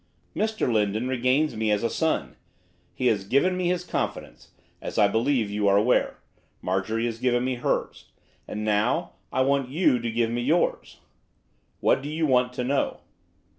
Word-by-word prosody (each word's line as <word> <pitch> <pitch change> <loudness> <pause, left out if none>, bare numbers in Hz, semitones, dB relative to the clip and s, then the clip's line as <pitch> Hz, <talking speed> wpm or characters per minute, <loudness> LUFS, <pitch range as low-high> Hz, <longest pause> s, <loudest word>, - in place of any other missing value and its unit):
'Mr 220 0 0
Lindon 110 +2 0
regards 130 +3 +1
me 110 0 -1
as 105 0 +1
a - - +3
son. 155 - -1 0.6
He 130 - -3
has 105 -5 +2
given 140 - +2
me 180 -1 -1
his 180 0 0
confidence; - - -4 0.3
as - - -6
I 105 - +6
believe 115 0 +1
you 105 0 0
are 100 0 +5
aware, 110 +5 +2 0.4
Marjorie 105 +5 -1
has 115 -1 -3
given 125 0 +1
me 130 - 0
hers; 120 - -2 0.4
and 105 0 -4
now 110 +11 +1 0.2
I 130 - +1
want 135 -1 +1
you 140 -4 +2
to 115 0 -3
give 115 0 0
me 120 +1 -1
yours.' 155 +8 0 0.8
'What - - +3
do 145 - -6
you 160 +1 -1
want 125 -3 +2
to 125 - -3
know? 135 +3 -1
125 Hz, 170 wpm, -25 LUFS, 110-140 Hz, 0.8 s, I